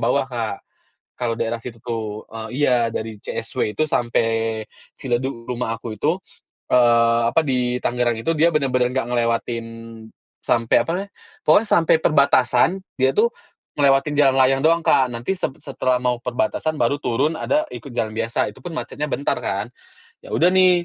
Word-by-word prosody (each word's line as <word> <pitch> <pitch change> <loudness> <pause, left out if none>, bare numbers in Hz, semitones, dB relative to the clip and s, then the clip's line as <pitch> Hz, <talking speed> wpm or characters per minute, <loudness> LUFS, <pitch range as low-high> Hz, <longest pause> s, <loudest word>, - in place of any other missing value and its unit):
bawah, - - +1
Kak, - - -4 0.5
kalau 115 -2 -3
daerah 115 +1 -2
situ 115 0 -8
tuh. 110 -3 -4
Eee, 110 0 -6 0.2
iya, 120 -3 +3
dari 110 -2 -5
CSW 105 - -3
itu 155 - +2
sampai 115 -4 0 0.3
Ciledug 120 -1 -3
rumah 120 -2 -3
aku 115 -2 -8
itu, 160 +4 +2 0.6
eee, 115 -1 +4
apa, 140 - +3
di 125 -3 0
Tangerang 120 -1 0
itu, 115 +9 -1
dia 165 +2 +3
benar-benar 130 -5 +1
nggak 130 - 0
ngelewatin 115 -1 0 0.8
sampai, 115 -1 +2
apa - - -5
namanya 200 +2 -5 0.3
pokoknya 220 - +4
sampai 165 -4 +4
perbatasan, 140 -3 +4 0.3
dia 130 0 +2
tuh 220 +8 +3 0.5
ngelewatin 140 +1 +3
jalan 140 -2 +4
layang 135 +1 +4
doang, 165 +1 +4
Kak, 130 -2 +3
nanti 120 +11 -3
sep 180 - -2
setelah 130 -2 -1
mau 125 -1 0
perbatasan, 125 +5 -1
baru 120 +4 +2
turun 145 +6 0
ada 305 - 0
ikut 140 - -8
jalan 110 -2 -2
biasa, 115 -1 0
itu - - -17
pun 175 - -5
macetnya 150 +1 -4
bentar 140 - 0
kan. 100 +3 -2 0.6
Ya - - -11
udah 175 - +4
nih, 185 -2 +4
125 Hz, 165 wpm, -21 LUFS, 115-145 Hz, 0.8 s, eee